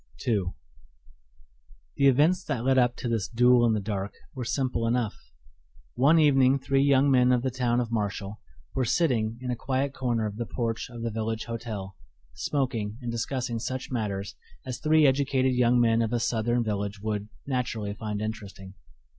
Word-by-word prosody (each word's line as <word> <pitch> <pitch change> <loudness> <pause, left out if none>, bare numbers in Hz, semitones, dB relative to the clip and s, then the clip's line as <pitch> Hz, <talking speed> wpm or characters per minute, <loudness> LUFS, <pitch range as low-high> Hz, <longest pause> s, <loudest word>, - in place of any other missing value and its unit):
II 105 -6 +2 1.5
The 140 - +4
events 150 +7 +4
that 125 -5 -2
led 130 0 +4
up 120 -1 +2
to - - -5
this 115 -4 -1
"duel 120 +1 +4
in 115 - +3
the 110 - 0
dark" 100 -1 -4 0.2
were 130 - -5
simple 125 -2 -1
enough. 115 -3 0 0.8
One 145 +6 +4
evening 135 -3 +5
three 135 0 +1
young 140 0 +4
men 125 -1 +5
of 125 -1 +2
the 130 - 0
town 125 -1 0
of 120 -2 -2
Marshall 105 -2 -3 0.3
were 130 - 0
sitting 115 -5 +1
in 125 -1 -3
a - - -1
quiet 135 +3 -1
corner 120 -5 -1
of 105 -1 -5
the 120 -1 -3
porch 115 -1 -3
of 120 -2 -8
the 115 - -2
village 110 0 -2
hotel, 110 -5 -6 0.4
smoking 115 - -2
and 120 -3 -4
discussing 120 0 -2
such 130 +3 -4
matters 100 -5 -3 0.3
as 130 -2 -5
three 155 0 +4
educated 135 -1 +2
young 125 0 +3
men 115 -1 +3
of 115 +1 -1
a 120 - +1
Southern 120 +1 0
village 100 -2 -3
would 105 0 -3 0.2
naturally 120 -6 -2
find 105 0 -4
interesting. 100 -3 -7
120 Hz, 175 wpm, -27 LUFS, 110-130 Hz, 1.5 s, evening